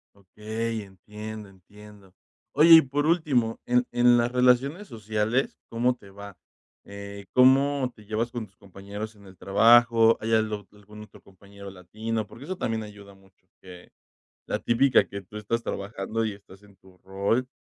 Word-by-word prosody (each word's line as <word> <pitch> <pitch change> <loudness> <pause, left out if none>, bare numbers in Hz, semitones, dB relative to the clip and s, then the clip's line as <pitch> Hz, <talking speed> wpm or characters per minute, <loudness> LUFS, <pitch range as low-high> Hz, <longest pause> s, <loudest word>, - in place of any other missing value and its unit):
Okey, 110 +3 -5
entiendo, 105 +2 -10
entiendo. 100 +1 -17 0.4
Oye, 160 +3 +7
y 160 - +9
por 145 +2 -2
último, 140 -9 +1
en 125 0 +1
en 120 0 +4
las 120 0 +1
relaciones 125 +9 +2
sociales, 110 - -2
¿cómo 120 +2 +1
te 100 -5 -17
va? 100 -1 -11 0.5
Eh, 100 0 -10
¿cómo 135 +1 +4
te 105 - -16
llevas 110 +3 -2
con 120 -2 -5
tus 95 - -30
compañeros 100 +3 -9
en 100 -1 -19
el 95 -2 -16
trabajo? 115 +3 +4
¿Hay 115 +1 0
algo 110 -2 -1
algún 105 +1 -15
otro 105 - -16
compañero 100 +1 -14
latino? 110 +4 -5
Porque 115 +5 -13
eso 185 +4 -6
también 110 -1 -2
ayuda 100 -1 -12
mucho. 95 -1 -26 0.2
Que 90 -1 -13 0.6
la - - -1
típica 125 +3 +2
que 100 - -7
tú 100 +3 -12
estás 110 +3 -2
trabajando, 100 +2 -4
y 110 - -2
estás 100 0 -17
en 100 -1 -20
tu 95 -1 -21
rol, 100 +6 -1
110 Hz, 165 wpm, -25 LUFS, 100-120 Hz, 0.6 s, y